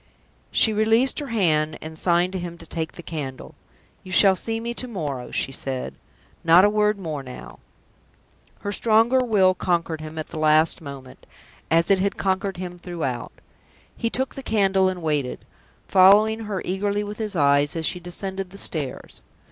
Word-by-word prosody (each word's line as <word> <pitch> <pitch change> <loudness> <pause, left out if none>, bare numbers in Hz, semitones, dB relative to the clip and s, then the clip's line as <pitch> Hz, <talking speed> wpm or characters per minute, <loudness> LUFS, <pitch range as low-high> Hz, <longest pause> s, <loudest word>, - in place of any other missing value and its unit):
She 220 - +3
released 225 +6 +2
her 290 - -5
hand, 155 - +1
and 160 0 -8
signed 175 +2 +1
to 190 - -2
him 175 -1 -6
to - - -13
take 160 -2 -4
the 175 - -11
candle. 145 -5 -6 0.5
"You 185 - -10
shall 190 +1 +6
see 225 +4 -4
me 235 +1 -4
to 255 - -4
morrow," 145 - -5
she 135 - -1
said. 130 -1 -4 0.5
"Not 170 +4 +7
a 205 - +3
word 210 0 +2
more 160 -7 -5
now!" 125 -2 -11 1.0
Her 205 - -3
stronger 225 +4 +3
will 205 -7 +3
conquered 170 -3 -1
him 155 0 -8
at 155 - -5
that - - -8
last 155 +1 +3
moment, 140 -3 -11 0.4
as 165 +3 +3
it 195 - +4
had 200 +1 -1
conquered 190 0 -1
him 180 -1 -7
throughout. 160 -10 -4 0.6
He 230 - -2
took 260 +3 -3
the 270 - -7
candle 195 -5 +2
and 180 -2 -6
waited, 150 -5 -2 0.4
following 210 +4 +5
her 200 -3 -4
eagerly 205 +2 -1
with 210 +1 -7
his 210 -3 -3
eyes 145 -1 +3
as 165 -1 -2
she 180 - -1
descended 190 +2 -5
the 195 - -12
stairs. 145 -9 -2
185 Hz, 175 wpm, -23 LUFS, 155-205 Hz, 1.0 s, Not